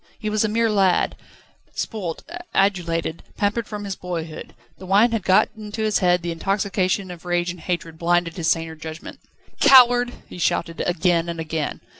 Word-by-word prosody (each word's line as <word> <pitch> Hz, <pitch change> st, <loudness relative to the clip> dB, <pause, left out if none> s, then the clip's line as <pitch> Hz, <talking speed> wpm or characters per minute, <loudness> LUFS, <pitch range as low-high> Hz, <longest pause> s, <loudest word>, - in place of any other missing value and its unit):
He 215 Hz, -, -3 dB
was 215 Hz, 0 st, +1 dB
a 220 Hz, -, +1 dB
mere 230 Hz, +2 st, +2 dB
lad, 195 Hz, -3 st, +2 dB, 0.6 s
spoilt, 190 Hz, -8 st, -4 dB, 0.3 s
adulated, 170 Hz, -4 st, 0 dB, 0.2 s
pampered 210 Hz, +2 st, 0 dB
from 210 Hz, -1 st, -6 dB
his 200 Hz, -1 st, -4 dB
boyhood: 165 Hz, -4 st, -6 dB, 0.2 s
the 185 Hz, -, -10 dB
wine 205 Hz, +5 st, +4 dB
had 225 Hz, -2 st, 0 dB
got 190 Hz, 0 st, +4 dB
into 215 Hz, 0 st, -5 dB
his 215 Hz, -1 st, +2 dB
head, 180 Hz, -2 st, +2 dB
the 170 Hz, -, -2 dB
intoxication 195 Hz, +1 st, -1 dB
of 175 Hz, -2 st, -10 dB
rage 175 Hz, 0 st, 0 dB
and 180 Hz, -, -10 dB
hatred 165 Hz, -1 st, -4 dB
blinded 175 Hz, -1 st, +1 dB
his 165 Hz, -3 st, -1 dB
saner 165 Hz, -1 st, 0 dB
judgment. 160 Hz, +1 st, -9 dB, 0.4 s
"Coward!" 245 Hz, -3 st, +7 dB, 0.2 s
he -, -, -10 dB
shouted 165 Hz, +1 st, -1 dB
again 175 Hz, -1 st, +1 dB
and 170 Hz, -1 st, -5 dB
again. 160 Hz, -2 st, -3 dB
180 Hz, 170 wpm, -22 LUFS, 170-210 Hz, 0.6 s, Coward